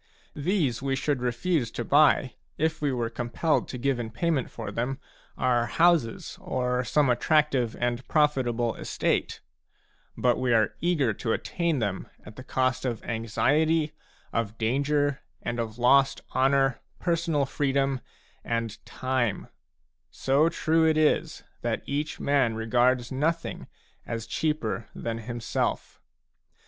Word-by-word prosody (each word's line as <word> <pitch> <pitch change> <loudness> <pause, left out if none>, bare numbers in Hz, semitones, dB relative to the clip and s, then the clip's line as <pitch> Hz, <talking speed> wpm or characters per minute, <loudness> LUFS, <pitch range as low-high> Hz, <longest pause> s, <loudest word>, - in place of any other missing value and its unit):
These 150 - 0
we 135 0 0
should 140 -1 -1
refuse 125 +2 0
to 120 - -5
buy, 145 -2 +4 0.2
if 160 0 0
we 145 -2 +1
were 120 -2 -2
compelled 120 +7 0
to 125 - -6
give 130 0 0
in 115 -2 -3
pay 170 +10 -1
ment 135 -6 0
for 115 - -6
them 130 +3 -2 0.4
our 120 -2 +2
houses 155 0 +2
or 125 0 -1
some 145 +3 +2
attractive 130 -1 +2
and 120 +1 -1
profitable 125 -6 +1
estate; - - -1 0.8
but 125 -1 +2
we 125 -2 +2
are 110 -3 +2
eager 155 -10 +2
to 115 +2 -2
attain 170 -3 -1
them 100 -6 -2 0.2
at 105 - -11
the 130 - -9
cost 130 -1 0
of 120 -4 -3
anxiety, 150 +8 +1 0.4
of 115 -2 -2
danger, 140 +4 +1 0.2
and 120 0 -3
of 110 -1 -4
lost 135 +3 +4
honour, 135 -1 +3 0.2
personal 165 -4 0
freedom, 135 -1 0 0.4
and 115 -2 -3
time; 130 -4 -1 0.6
so 140 +5 +2
true 165 -1 +2
it 160 -1 +3
is 155 -1 +1 0.2
that - - -2
each 145 +2 -3
man 140 -5 +2
regards 120 +2 +2
nothing 160 +5 -2 0.4
as 115 -1 -4
cheaper 120 -8 -2
than 115 -1 -4
himself. 120 +1 -3
130 Hz, 135 wpm, -27 LUFS, 120-150 Hz, 0.8 s, buy